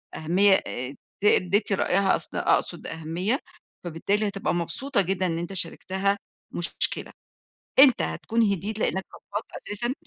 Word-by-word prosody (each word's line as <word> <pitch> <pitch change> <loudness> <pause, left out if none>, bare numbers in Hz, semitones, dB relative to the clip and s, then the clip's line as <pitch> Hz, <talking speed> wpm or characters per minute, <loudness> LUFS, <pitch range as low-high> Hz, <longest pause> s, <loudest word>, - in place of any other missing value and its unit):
أهمية 185 +5 +4
آآ، 130 +3 -5 0.3
ت - - -2
تدّي 200 0 +4
رأيها، 190 +1 +2
اص - - -2
أقصد - - +1
أهمية، 170 - -2 0.4
فبالتالي 195 +5 0
هتبقى 200 -1 -2
مبسوطة 200 +9 0
جدًا 190 0 -1
إن 165 -2 -1
أنت 175 +3 -5
شاركتها 190 +2 -1 0.3
مشكلة، 175 - 0 0.7
أنت 265 -2 +8
هتكون 230 +1 -1
هديت 200 +4 -3
لإنك 190 -2 0
فضفضت 205 +2 -6
أساسًا، 240 +5 -2
195 Hz, 130 wpm, -26 LUFS, 175-205 Hz, 0.7 s, أنت